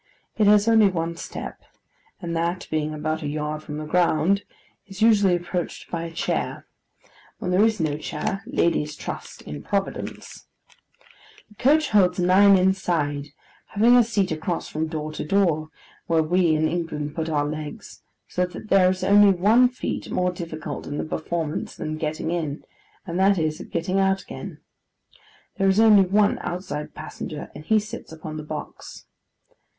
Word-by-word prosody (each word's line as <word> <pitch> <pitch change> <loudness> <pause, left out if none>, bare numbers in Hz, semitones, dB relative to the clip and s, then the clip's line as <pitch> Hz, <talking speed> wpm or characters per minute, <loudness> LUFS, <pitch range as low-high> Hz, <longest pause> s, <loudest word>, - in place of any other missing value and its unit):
It 210 -2 +3
has 210 +1 +5
only 220 -3 +6
one 170 -2 -2
step, - - -7 0.6
and 170 -3 -4
that 170 +2 -2
being 155 -1 -1
about 155 +1 -3
a 150 - -3
yard 150 +1 -3
from 150 -1 -7
the 155 - -5
ground, 180 +4 +2 0.4
is 195 +2 -4
usually 205 -5 +5
approached 175 0 -4
by 170 -1 -3
a 165 - -6
chair: 165 - -2 0.7
when 180 -5 -3
there 185 +3 +4
is 220 -2 +2
no 150 -2 -1
chair, 165 +5 -3
ladies 170 - 0
trust - - -7
in 75 -1 -7
Providence. 195 - -4 1.0
The - - -18
coach 305 +4 +3
holds 190 -4 +3
nine 190 +2 +6
inside, 170 -6 0 0.4
having 230 +4 +4
a 245 - +7
seat 210 -5 0
across 160 +2 -2
from 155 +1 -2
door 155 -1 -4
to - - -4
door, 155 -3 +1 0.4
where 165 -1 +3
we 170 0 +2
in 155 +1 +2
England 155 -4 -3
put 160 0 -3
our 145 -2 +1
legs: 150 0 -7 0.3
so 180 0 -1
that 210 +4 -10
there 185 -2 +5
is 185 0 -2
only 205 0 +6
one 215 +7 +4
feat 250 - -5
more 180 0 0
difficult 160 -4 -6
in 145 - -4
the - - -2
performance 160 0 -3
than 155 0 -4
getting 155 +1 -3
in, 155 -4 -3 0.4
and 175 -1 -3
that 195 +1 +4
is, 155 -2 -1
getting 185 +3 0
out 195 0 +2
again. - - -9 1.0
There 195 -1 +3
is 190 +2 +3
only 215 -3 +7
one 205 +2 +3
outside 175 -4 -5
passenger, 150 -2 -7
and 150 - -10
he 220 +7 +3
sits 215 -4 -5
upon 155 -1 -7
the 155 - -6
box. 150 0 -8
175 Hz, 165 wpm, -24 LUFS, 155-195 Hz, 1.0 s, a